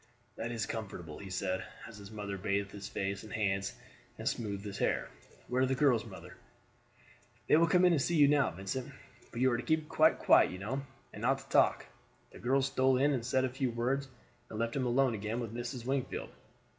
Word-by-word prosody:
"That 115 +1 -4
is 115 -3 -2
comfortable," 90 -8 -6
he 100 - -8
said, 95 0 -2 0.2
as 110 -3 -11
his 100 -1 -10
mother 105 -2 -5
bathed 100 +1 -1
his 100 -1 -7
face 95 -1 -3
and 110 - -11
hands 95 -2 0 0.4
and - - -5
smoothed 100 -3 -2
his 100 -1 -6
hair. - - 0 0.4
"Where 125 +1 0
are - - +5
the 130 - +1
girls, 125 -4 +3
mother?" - - -11 1.1
"They - - +5
will 165 +2 +5
come 180 +2 +4
in 180 - +6
to 160 - +3
see 170 +5 0
you 145 -3 +7
now, 145 -2 +4
Vincent; 100 +8 -5 0.4
but 115 - -6
you 130 +1 +4
are 120 - +1
to - - -3
keep 160 -1 0
quite - - +4
quiet - - +5
you 90 - -6
know, 115 +9 -3 0.3
and 105 - -8
not 135 +3 +2
to 135 0 -14
talk." - - +3 0.5
The - - -12
girls 130 +3 +2
stole 130 -1 +2
in 145 +3 +3
and 125 -4 -1
said 130 +2 +1
a - - -1
few 130 0 -1
words, 125 +4 -1 0.4
and 110 - -6
left 115 +1 -1
him 130 -2 0
alone 130 +1 +3
again 110 +2 -3
with 115 -3 -5
Mrs. 120 0 -5
Wingfield. 135 0 -2
120 Hz, 220 wpm, -32 LUFS, 100-135 Hz, 1.1 s, you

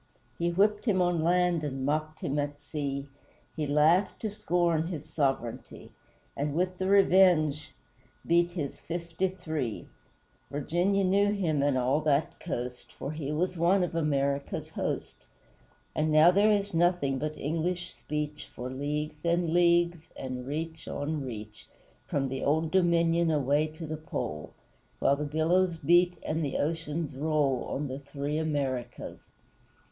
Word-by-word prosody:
He 170 0 +1
whipped 205 +6 +2
him 205 -6 +2
on 175 -2 +2
land 175 -1 +2
and 135 -2 -3
mocked 155 +2 -1
him 145 +2 -1
at 145 0 -3
sea, 140 -1 -4 0.5
He 155 -2 -2
laughed 155 +7 +3
to 215 - -1
scorn 170 -5 +1
his 155 -4 -5
sovereignty, 135 -6 -3 0.4
And 145 +1 -2
with 180 +1 0
the 190 - 0
Revenge 180 -6 +4 0.5
beat 170 +1 +3
his 160 -6 -5
fifty 170 +2 -2
three; 155 - -4 0.6
Virginia 175 +8 +1
knew 200 +2 +3
him, 165 -8 0
and 140 -2 +2
all 130 +4 +2
that 150 0 +1
coast, 125 -6 -5
For 140 - -5
he 150 -2 -4
was 180 +4 -1
one 180 +3 +3
of 175 - -2
America's 140 -3 -1
host - - -4 0.7
And 155 0 0
now 155 +3 +7
there 200 +3 +4
is 200 -1 0
nothing 165 -6 +2
but 155 +2 -3
English 170 +4 -2
speech 150 0 -5
For 125 +1 -5
leagues 150 +2 -3
and 170 -1 +1
leagues, 170 -1 +3
and 130 -1 -5
reach 160 +2 -4
on 150 0 -3
reach, 110 -4 -8 0.4
From 135 -1 0
the 135 0 -4
Old 160 +2 +1
Dominion 170 -2 +3
away 145 0 +2
to 155 +2 -8
the 155 0 -4
Pole; 75 - -5 0.5
While 140 - +2
the 150 - -2
billows 165 +4 +2
beat 175 +3 +3
and 160 +1 -1
the 140 - -1
oceans 160 -1 -2
roll 145 -3 +1
On 145 +1 -3
the 130 +1 -5
Three 145 +2 -3
Americas. 135 -6 -3
155 Hz, 150 wpm, -29 LUFS, 145-175 Hz, 0.7 s, now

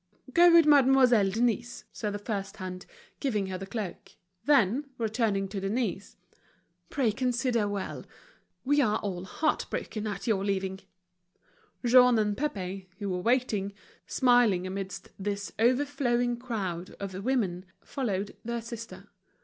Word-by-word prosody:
"Go 345 +2 +7
with 335 -1 +7
Mademoiselle 260 -7 +5
Denise," 235 +3 -1
said 210 -2 -3
the - - -2
first 205 -2 -4
hand, 185 -1 -7 0.3
giving 215 -8 0
her 190 -1 -4
the 195 - -7
cloak. 200 -3 -6 0.3
Then, 275 0 +3
returning 220 -3 0
to 200 0 -4
Denise: 200 0 -2 0.7
"Pray 260 -6 +1
consider 245 -1 0
well. 205 -1 -4 0.6
We 290 +2 +4
are 215 -5 +2
all 185 -3 -4
heart 305 - -1
broken 215 0 -4
at 200 -2 -4
your 205 -4 +1
leaving." 190 -1 -1 1.1
Jean 250 0 +6
and 210 -1 +1
Pépé, 195 -9 -4
who 205 -2 -4
were 180 0 -2
waiting, 220 -3 +1 0.3
smiling 245 -8 +3
amidst 190 0 -5
this 200 0 -3
overflowing 245 -1 +1
crowd 195 -8 -4
of 195 -1 -5
women, 200 -8 0 0.2
followed 205 -7 -3
their 235 0 -3
sister. 230 -1 -8
215 Hz, 135 wpm, -28 LUFS, 195-250 Hz, 1.1 s, Go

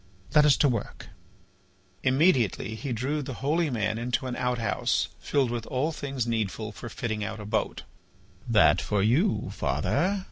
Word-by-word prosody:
Let 150 -1 +6
us 145 - +5
to 145 - +4
work." 115 -7 -3 0.9
Immediately 130 - +2
he 130 +4 -5
drew 135 +6 -1
the 135 -2 -6
holy 155 +5 0
man 110 -3 -1
into 125 +3 -1
an 125 -1 -3
outhouse 125 -2 0
filled 135 -4 0
with 115 -2 -4
all 135 +5 0
things 135 -5 -3
needful 110 -2 -2
for 120 - -8
fitting 110 -1 -3
out 110 +1 -5
a 105 - -7
boat. 105 - -2 0.7
"That 95 -7 +5
for 105 -2 0
you, 135 - +2
father!" 200 +2 0
125 Hz, 155 wpm, -27 LUFS, 110-140 Hz, 0.9 s, Let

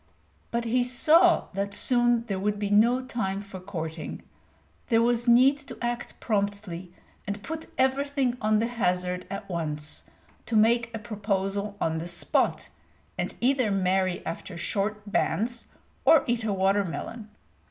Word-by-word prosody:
But 235 0 -2
he 245 +2 +2
saw 320 +8 +4
that 200 +1 -2
soon 240 -1 +3
there 195 -5 -3
would 205 +1 0
be 205 -1 -2
no 235 +5 +4
time 195 -7 -2
for 200 -2 -9
courting; 160 -5 -6 0.6
there 225 - +3
was 240 0 +1
need 260 +4 +6
to 290 - -10
act 240 0 -4
promptly, 200 -4 -2 0.4
and 205 0 -4
put 320 0 -6
everything 265 -1 +1
on 215 0 +3
the 225 - +1
hazard 180 -6 -1
at 195 +1 -6
once, 155 -4 -4 0.5
to 230 - -2
make 230 +2 +4
a 225 - -4
proposal 205 -2 -2
on 160 0 0
the 165 - -5
spot, 175 0 0 0.4
and - - -3
either 255 -2 +2
marry 185 -1 0
after 170 +2 -6
short 205 +4 -2
bans 225 +3 -1 0.4
or 315 -4 +6
eat 240 -2 0
a 220 - 0
watermelon. 195 +3 -1
210 Hz, 145 wpm, -27 LUFS, 190-240 Hz, 0.6 s, need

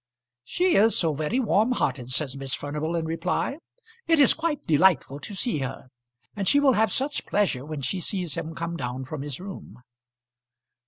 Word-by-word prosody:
"She 360 - +1
is 220 +3 +5
so 165 -3 +2
very 155 - -1
warm 225 0 +2
hearted," 125 - -1
said 130 +1 -1
Miss 135 -1 -3
Furnival 150 +3 -3
in 165 -1 -1
reply. 175 - -2 0.5
"It 330 -1 +4
is 285 - +6
quite 320 -3 -2
delightful 155 -3 +3
to 205 - -7
see 220 - 0
her. 135 -1 -5 0.5
And 200 -2 -2
she 285 - +5
will 280 -2 +4
have 220 -2 +2
such 275 +7 -1
pleasure 190 -11 +1
when 150 -1 -6
she 160 +9 -1
sees 180 -4 -2
him 165 -1 -5
come 170 0 -4
down 130 -1 -4
from 140 +2 -6
his 140 -2 -5
room." 180 - -10
165 Hz, 180 wpm, -25 LUFS, 145-220 Hz, 0.5 s, is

